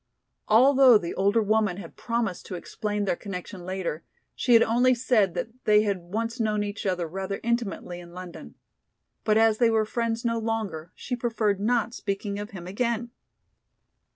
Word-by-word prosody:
Although 255 Hz, +2 st, +7 dB
the 170 Hz, -4 st, -4 dB
older 200 Hz, +4 st, +2 dB
woman 210 Hz, -3 st, +1 dB
had 175 Hz, -4 st, -9 dB
promised 230 Hz, -6 st, -2 dB
to 185 Hz, -, -5 dB
explain 205 Hz, +3 st, -3 dB
their 190 Hz, -, +1 dB
connection 180 Hz, -1 st, -7 dB
later, 180 Hz, -3 st, -4 dB, 0.3 s
she 245 Hz, -2 st, +3 dB
had 230 Hz, -, +7 dB
only 245 Hz, +3 st, +3 dB
said 230 Hz, -7 st, +2 dB
that -, -, -2 dB, 0.2 s
they 210 Hz, 0 st, +5 dB
had 200 Hz, -3 st, 0 dB
once 225 Hz, +7 st, -4 dB
known 215 Hz, -2 st, +1 dB
each 205 Hz, 0 st, -4 dB
other 180 Hz, -3 st, -1 dB
rather 195 Hz, +3 st, -4 dB
intimately 225 Hz, -6 st, -2 dB
in 175 Hz, -1 st, -12 dB
London. 180 Hz, -1 st, -10 dB, 0.7 s
But 215 Hz, 0 st, +3 dB
as 225 Hz, -1 st, +4 dB
they 235 Hz, -2 st, +5 dB
were 220 Hz, -1 st, +2 dB
friends 230 Hz, +1 st, -2 dB
no 230 Hz, -1 st, +1 dB
longer, 210 Hz, -8 st, -3 dB
she 245 Hz, -, -4 dB
preferred 225 Hz, -4 st, 0 dB
not 230 Hz, +1 st, +1 dB
speaking 200 Hz, -1 st, -3 dB
of 205 Hz, +1 st, -6 dB
him 180 Hz, -4 st, -9 dB
again. 235 Hz, +4 st, -2 dB
210 Hz, 170 wpm, -26 LUFS, 190-230 Hz, 0.7 s, Although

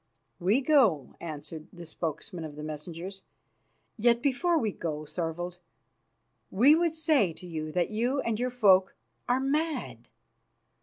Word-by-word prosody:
"We 200 Hz, +9 st, +2 dB
go," 235 Hz, -, +3 dB
answered 155 Hz, -1 st, -7 dB
the 175 Hz, -1 st, -10 dB
spokesman 165 Hz, +2 st, -5 dB
of 150 Hz, -2 st, -7 dB
the 150 Hz, -, -7 dB
messengers; 165 Hz, +5 st, -7 dB, 0.8 s
"yet 235 Hz, +1 st, +4 dB
before 330 Hz, +6 st, +2 dB
we 220 Hz, -8 st, 0 dB
go, 155 Hz, -4 st, -4 dB
Thorvald, 175 Hz, +2 st, -4 dB, 0.9 s
we 250 Hz, +10 st, +6 dB
would 330 Hz, 0 st, +2 dB
say 300 Hz, -, +2 dB
to 180 Hz, -, -11 dB
you 155 Hz, -3 st, -5 dB
that 180 Hz, +3 st, 0 dB
you 240 Hz, +6 st, 0 dB
and 230 Hz, -2 st, -2 dB
your 250 Hz, +1 st, 0 dB
folk 195 Hz, -6 st, +4 dB, 0.3 s
are 250 Hz, +1 st, +3 dB
mad. 270 Hz, -, -2 dB
190 Hz, 140 wpm, -29 LUFS, 160-255 Hz, 0.9 s, we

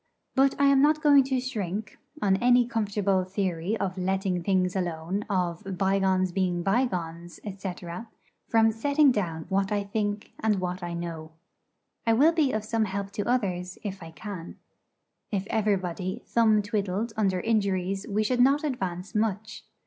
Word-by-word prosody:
But 270 Hz, 0 st, +3 dB
I 280 Hz, -, +4 dB
am 275 Hz, -1 st, +5 dB
not 305 Hz, +1 st, +3 dB
going 285 Hz, -2 st, +7 dB
to 265 Hz, -1 st, 0 dB
shrink, 215 Hz, -5 st, -4 dB, 0.2 s
on 190 Hz, -2 st, +3 dB
any 245 Hz, +2 st, +4 dB
comfortable 205 Hz, -4 st, 0 dB
theory 185 Hz, +1 st, -2 dB
of 190 Hz, -2 st, -3 dB
'letting 190 Hz, -1 st, 0 dB
things 185 Hz, 0 st, +1 dB
alone,' 175 Hz, +2 st, -2 dB
of 185 Hz, 0 st, -2 dB
'bygones 190 Hz, -1 st, +2 dB
being 180 Hz, -2 st, 0 dB
bygones,' 175 Hz, -6 st, -1 dB, 0.2 s
&c., 190 Hz, -2 st, -3 dB, 0.8 s
from 225 Hz, -1 st, +4 dB
setting 280 Hz, +5 st, +3 dB
down 165 Hz, -8 st, -2 dB
what 195 Hz, 0 st, +1 dB
I 205 Hz, -1 st, +1 dB
think 205 Hz, 0 st, -3 dB
and 215 Hz, -3 st, +1 dB
what 180 Hz, 0 st, -3 dB
I 175 Hz, -1 st, -4 dB
know. 165 Hz, -2 st, -6 dB, 0.7 s
I 225 Hz, -, +5 dB
will 290 Hz, +8 st, +5 dB
be 310 Hz, -5 st, +2 dB
of 215 Hz, -1 st, -2 dB
some 225 Hz, 0 st, +1 dB
help 200 Hz, 0 st, -4 dB
to 205 Hz, +3 st, -3 dB
others 185 Hz, -7 st, -1 dB
if 200 Hz, -2 st, -5 dB
I 165 Hz, -, -8 dB
can. 175 Hz, +1 st, -8 dB, 0.7 s
If 195 Hz, -2 st, -2 dB
everybody 195 Hz, -1 st, -1 dB
thumb 220 Hz, -3 st, +3 dB
twiddled 205 Hz, +1 st, -2 dB
under 195 Hz, -4 st, +1 dB
injuries 195 Hz, -2 st, 0 dB
we 210 Hz, +1 st, +1 dB
should 245 Hz, +3 st, +1 dB
not 275 Hz, +4 st, +4 dB
advance 190 Hz, -, -3 dB
much. 215 Hz, 0 st, -2 dB
200 Hz, 155 wpm, -27 LUFS, 185-225 Hz, 0.8 s, going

